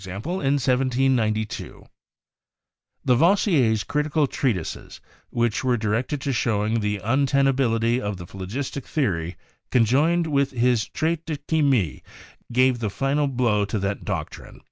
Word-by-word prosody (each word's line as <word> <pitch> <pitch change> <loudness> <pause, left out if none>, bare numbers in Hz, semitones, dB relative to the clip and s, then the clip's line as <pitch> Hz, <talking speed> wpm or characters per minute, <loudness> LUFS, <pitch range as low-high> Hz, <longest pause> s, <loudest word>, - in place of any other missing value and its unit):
in 95 - -6 0.4
1792). 125 -4 0 1.2
Lavoisier's 135 - +3
critical 150 +4 0
treatises, 115 - -3 0.3
which 120 -1 0
were 125 -1 +2
directed 115 +6 -1
to 135 0 -2
showing 110 -1 0
the 105 -1 -1
untenability 130 -2 +2
of 105 -1 -3
the 90 - -8
phlogistic 105 +10 -5
the 150 -3 +1
ory, 85 -4 -2 0.3
conjoined 145 +9 +3
with 140 -3 +1
his 120 -2 +1
"Traite 165 +1 -1
de 155 -2 -2
Chimie," 140 - +1 0.5
gave 130 0 +3
the 110 -3 -1
final 140 +8 0
blow 120 -6 +1
to 100 +2 -2
that 100 0 -2
doctrine. - - -6
125 Hz, 120 wpm, -24 LUFS, 110-140 Hz, 1.2 s, Lavoisier's